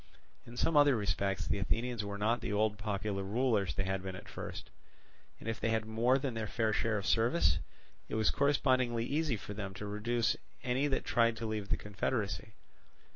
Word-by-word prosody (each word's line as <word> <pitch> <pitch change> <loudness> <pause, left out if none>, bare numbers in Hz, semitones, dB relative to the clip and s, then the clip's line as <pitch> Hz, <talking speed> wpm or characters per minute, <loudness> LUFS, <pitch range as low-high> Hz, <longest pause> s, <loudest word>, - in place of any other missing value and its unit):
In 120 +1 -10
some 165 +5 +1
other 145 -2 +6
respects 100 -2 0
the 100 - 0
Athenians 115 +3 -1
were 100 0 -4
not 110 +4 +1
the - - -3
old 105 0 +1
popular 105 -1 -2
rulers 105 - +1
they 95 - 0
had 95 0 -1
been 95 0 -5
at 95 - -10
first; - - -7 0.7
and - - -9
if 115 -1 -2
they 115 - 0
had 110 -1 +1
more 115 +4 +3
than 135 -2 -2
their 110 -1 -3
fair 110 0 0
share 110 0 +1
of 100 - -3
service, 115 - +3 0.5
it - - -3
was 110 -1 +3
correspondingly 130 -4 +2
easy 145 -3 0
for 105 0 -7
them 100 -2 -5
to 105 - -5
reduce 110 +3 0 0.3
any 130 +3 +1
that 135 - -1
tried 115 -1 +3
to 115 - -4
leave 105 -2 -3
the - - +2
confederacy. 105 -1 -2
110 Hz, 195 wpm, -33 LUFS, 100-120 Hz, 0.7 s, other